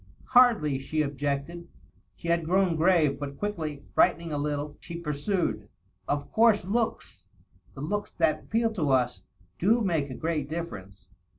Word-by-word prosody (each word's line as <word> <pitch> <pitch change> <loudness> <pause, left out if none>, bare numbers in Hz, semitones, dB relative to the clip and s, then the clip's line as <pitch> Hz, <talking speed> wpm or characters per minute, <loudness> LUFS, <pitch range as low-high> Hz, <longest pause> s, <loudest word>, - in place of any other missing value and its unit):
"Hardly," 225 - +5
she 155 +3 -1
objected. 145 +4 -3 0.5
She 170 - -6
had 170 0 +2
grown 185 0 +2
grave, 155 -4 +3
but 140 -1 -6
quickly, 160 -9 -4
brightening 165 -2 +2
a 145 - -1
little, 145 0 -3
she 170 0 -8
pursued, 150 - -2 0.4
"Of 145 0 -2
course 220 -4 +4
looks 200 - -2 0.3
— 90 0 -32
^the 140 +3 -4
looks 205 +3 -2
that 160 -2 +1
appeal 225 0 0
to 160 -9 -1
us 125 -6 +1 0.2
— 95 -1 -34
do 225 +7 +3
make 160 -7 0
a 130 - -6
great 155 -3 -2
difierence. 100 - -7
155 Hz, 160 wpm, -27 LUFS, 140-185 Hz, 0.5 s, Hardly